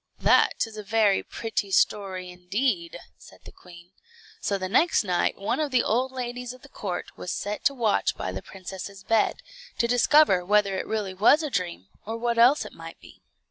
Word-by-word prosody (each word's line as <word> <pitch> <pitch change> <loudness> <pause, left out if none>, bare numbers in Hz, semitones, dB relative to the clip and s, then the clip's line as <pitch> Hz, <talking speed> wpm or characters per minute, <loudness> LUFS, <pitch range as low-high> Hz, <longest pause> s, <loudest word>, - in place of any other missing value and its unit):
"That - - +3
is 220 -1 -12
a 210 - -6
very 210 -2 +2
pretty 220 -3 -4
story, 190 -2 0
indeed," 245 - -2 0.2
said - - -17
the - - -11
queen. 175 0 -16 0.5
So 200 - -1
the 185 -1 -4
next 285 - +3
night 180 -3 0
one 200 - -2
of 305 -2 0
the 255 -2 +2
old 250 +4 0
ladies 250 -1 -5
of 255 - -17
the 280 - -14
court 185 -8 -5
was 180 - -6
set 205 +4 -4
to 280 - +3
watch 225 -5 +1
by 95 - -3
the 95 +1 -6
princess's 195 +1 -9
bed, 225 -1 +1 0.3
to 235 - +1
discover 245 -4 +4
whether 200 +1 +2
it - - -4
really 210 -4 -2
was 220 - +4
a 300 - -3
dream, 175 - -3 0.2
or 225 +2 -5
what 235 0 -1
else 255 +6 +5
it - - -10
might - - -11
be. - - -17
210 Hz, 195 wpm, -26 LUFS, 190-245 Hz, 0.5 s, else